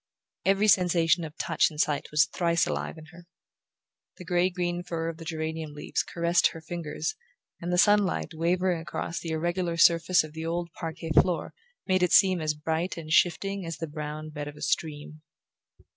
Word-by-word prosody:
Every 195 Hz, +2 st, +3 dB
sensation 175 Hz, -3 st, +3 dB
of 155 Hz, -1 st, -8 dB
touch 165 Hz, -, +2 dB
and 150 Hz, -, -11 dB
sight 150 Hz, -2 st, 0 dB
was 150 Hz, +1 st, +4 dB
thrice 170 Hz, 0 st, +1 dB
alive -, -, -3 dB
in 155 Hz, -, -11 dB
her. 175 Hz, 0 st, -15 dB, 0.9 s
The 180 Hz, -, -10 dB
grey 175 Hz, +1 st, +2 dB
green 175 Hz, -1 st, -2 dB
fur 165 Hz, -2 st, -3 dB
of 165 Hz, -, -7 dB
the 165 Hz, -, -10 dB
geranium 160 Hz, -2 st, -4 dB
leaves 150 Hz, -, -2 dB
caressed 170 Hz, 0 st, +2 dB
her 165 Hz, -, -8 dB
fingers 170 Hz, -, -4 dB, 0.5 s
and 175 Hz, +1 st, -3 dB
the 180 Hz, -, +1 dB
sunlight 205 Hz, -3 st, +3 dB
wavering 175 Hz, +1 st, 0 dB
across 165 Hz, +1 st, -4 dB
the 165 Hz, -, -6 dB
irregular 170 Hz, +2 st, -1 dB
surface 170 Hz, +1 st, +5 dB
of 155 Hz, -1 st, -10 dB
the 160 Hz, 0 st, -6 dB
old 170 Hz, +1 st, -3 dB
parquet 165 Hz, 0 st, -6 dB
floor 175 Hz, +2 st, +2 dB, 0.3 s
made 185 Hz, -1 st, +2 dB
it 180 Hz, -, +2 dB
seem 185 Hz, -3 st, +5 dB
as 155 Hz, -1 st, 0 dB
bright 160 Hz, +4 st, -2 dB
and 155 Hz, -1 st, -4 dB
shifting 195 Hz, +3 st, +2 dB
as 165 Hz, -1 st, -5 dB
the 165 Hz, -, -3 dB
brown 155 Hz, 0 st, -6 dB
bed 145 Hz, -1 st, -6 dB
of 145 Hz, -, -8 dB
a -, -, -9 dB
stream. 155 Hz, -1 st, -3 dB
165 Hz, 185 wpm, -27 LUFS, 160-175 Hz, 0.9 s, surface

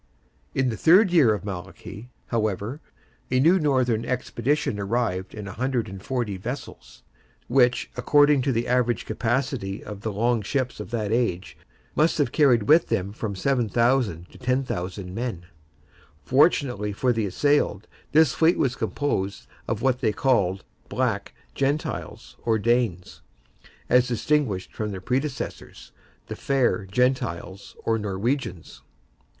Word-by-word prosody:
In 130 Hz, -1 st, +2 dB
the 110 Hz, -, -3 dB
third 185 Hz, -, +5 dB
year 150 Hz, -10 st, +5 dB
of 105 Hz, -1 st, -2 dB
Malachy, 100 Hz, +4 st, -8 dB, 0.2 s
however, 110 Hz, -, -2 dB, 0.5 s
a 130 Hz, -, +2 dB
new 170 Hz, +7 st, +5 dB
northern 130 Hz, -7 st, +1 dB
expedition 125 Hz, -2 st, -1 dB
arrived 100 Hz, -3 st, -2 dB
in 105 Hz, -2 st, -6 dB
140 115 Hz, -1 st, -3 dB
vessels, 120 Hz, +4 st, -8 dB, 0.4 s
which, 125 Hz, -1 st, +2 dB
according 145 Hz, +2 st, +4 dB
to 135 Hz, +1 st, 0 dB
the 115 Hz, -1 st, -1 dB
average 125 Hz, -2 st, +1 dB
capacity 115 Hz, -3 st, -2 dB
of 105 Hz, -2 st, -8 dB
the 110 Hz, -, -3 dB
long 115 Hz, +3 st, +1 dB
ships 130 Hz, +3 st, -2 dB
of 105 Hz, -, -7 dB
that 110 Hz, -3 st, -2 dB
age, 110 Hz, -6 st, -1 dB, 0.4 s
must 160 Hz, +3 st, +3 dB
have 145 Hz, -, +1 dB
carried 130 Hz, -8 st, +4 dB
with 160 Hz, +9 st, +5 dB
them 95 Hz, +2 st, -1 dB
from 105 Hz, -2 st, -4 dB
7,000 120 Hz, -5 st, +1 dB
to -, -, -15 dB
10,000 100 Hz, -8 st, -2 dB
men. 110 Hz, -6 st, -4 dB, 0.8 s
Fortunately 125 Hz, -, +2 dB
for 125 Hz, +4 st, +1 dB
the 110 Hz, -3 st, -1 dB
assailed, 125 Hz, -2 st, +1 dB, 0.3 s
this 155 Hz, -4 st, +5 dB
fleet 165 Hz, +2 st, +3 dB
was 125 Hz, -2 st, +1 dB
composed 100 Hz, -12 st, -2 dB, 0.2 s
of 110 Hz, 0 st, -2 dB
what 130 Hz, -2 st, +2 dB
they 115 Hz, -5 st, +1 dB
called 100 Hz, -6 st, +1 dB, 0.3 s
Black -, -, -1 dB, 0.2 s
Gentiles, 140 Hz, +3 st, -3 dB
or 115 Hz, -1 st, +2 dB
Danes, 115 Hz, -5 st, 0 dB, 0.7 s
as 125 Hz, 0 st, +4 dB
distinguished 120 Hz, -5 st, 0 dB
from 110 Hz, -1 st, -3 dB
their 95 Hz, -2 st, -5 dB
predecessors, 130 Hz, +6 st, -4 dB, 0.3 s
the -, -, -6 dB
Fair 125 Hz, -7 st, 0 dB
Gentiles, 115 Hz, -4 st, -1 dB
or 115 Hz, 0 st, +1 dB
Norwegians. 105 Hz, -, -3 dB
120 Hz, 130 wpm, -25 LUFS, 100-135 Hz, 0.8 s, third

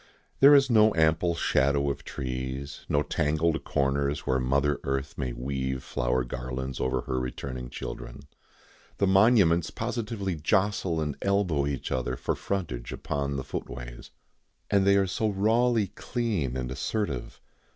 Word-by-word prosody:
There 140 Hz, +2 st, +9 dB
is 140 Hz, -1 st, +5 dB
no 110 Hz, -3 st, +5 dB
ample 80 Hz, +2 st, +2 dB
shadow 70 Hz, -2 st, +2 dB
of -, -, -7 dB
trees, 65 Hz, +2 st, -5 dB
no 75 Hz, 0 st, +2 dB
tangled 80 Hz, +2 st, 0 dB
corners 70 Hz, +1 st, 0 dB
where 65 Hz, 0 st, +1 dB
mother 70 Hz, +3 st, +1 dB
earth 70 Hz, 0 st, -2 dB
may 65 Hz, -2 st, -3 dB
weave 65 Hz, +1 st, -3 dB
flower 60 Hz, +1 st, 0 dB
garlands 65 Hz, +2 st, -5 dB
over 65 Hz, 0 st, 0 dB
her 65 Hz, -, -2 dB
returning 65 Hz, 0 st, -5 dB
children. -, -, -7 dB, 0.8 s
The 100 Hz, -, +2 dB
monuments 95 Hz, -4 st, +4 dB
positively 110 Hz, -4 st, -3 dB
jostle 95 Hz, +1 st, +1 dB
and 75 Hz, -2 st, -2 dB
elbow 90 Hz, -8 st, +1 dB
each 70 Hz, -2 st, -3 dB
other 65 Hz, -1 st, -1 dB
for -, -, -2 dB
frontage 75 Hz, -12 st, -4 dB
upon 70 Hz, -1 st, -3 dB
the 65 Hz, -, -3 dB
footways. -, -, -7 dB, 0.6 s
And 100 Hz, -1 st, +3 dB
they 100 Hz, 0 st, +6 dB
are 100 Hz, -, +3 dB
so 105 Hz, +4 st, -1 dB
rawly 110 Hz, +3 st, +2 dB
clean 105 Hz, -, -2 dB
and 65 Hz, -1 st, -3 dB
assertive. 70 Hz, -, -3 dB
70 Hz, 140 wpm, -27 LUFS, 65-100 Hz, 0.8 s, There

